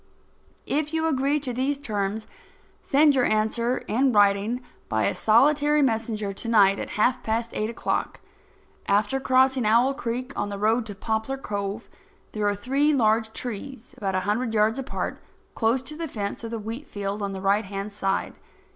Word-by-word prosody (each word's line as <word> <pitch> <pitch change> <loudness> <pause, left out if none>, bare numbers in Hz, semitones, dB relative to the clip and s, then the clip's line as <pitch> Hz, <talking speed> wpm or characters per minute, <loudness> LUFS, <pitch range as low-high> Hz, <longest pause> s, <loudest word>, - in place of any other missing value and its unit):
If 305 +2 -1
you 320 0 +1
agree 285 -1 +1
to 255 -3 -3
these 265 +3 0
terms, 215 -5 -3 0.6
send 295 +1 +4
your 255 -2 +2
answer 225 +3 +1
in 260 +4 +2
writing 205 +3 +3 0.3
by 110 -2 +1
a - - +1
solitary 290 +6 +4
messenger 220 -4 -1
to 215 - -7
night 200 -3 +5
at - - -5
half 245 +4 +2
past 230 +1 -2
eight 215 +1 -1
o'clock. 235 - -2 0.7
After 205 +6 +2
crossing 260 0 +3
Owl 235 +5 +4
Creek, 255 0 -4
on 205 - -2
the 200 - -5
road 220 +3 +1
to 205 - -7
Poplar 220 +6 -2
Cove, 205 -2 -4 0.4
there 210 -1 -1
are 205 - +1
three 275 +8 +1
large 220 -2 +2
trees 245 +1 -6
about 195 -2 -2
a 185 - +1
hundred 220 +4 -1
yards 220 +4 +2
apart, 270 - -4 0.3
close 235 +3 +1
to 300 +4 -7
the 330 +1 -4
fence 205 -5 -5
of 230 - -4
the 230 - -3
wheat 225 +7 -6
field 200 0 -4
on 200 -1 -2
the 190 - -5
right 200 +2 +2
hand 195 +1 -5
side. 195 -1 -1
225 Hz, 175 wpm, -25 LUFS, 205-260 Hz, 0.7 s, night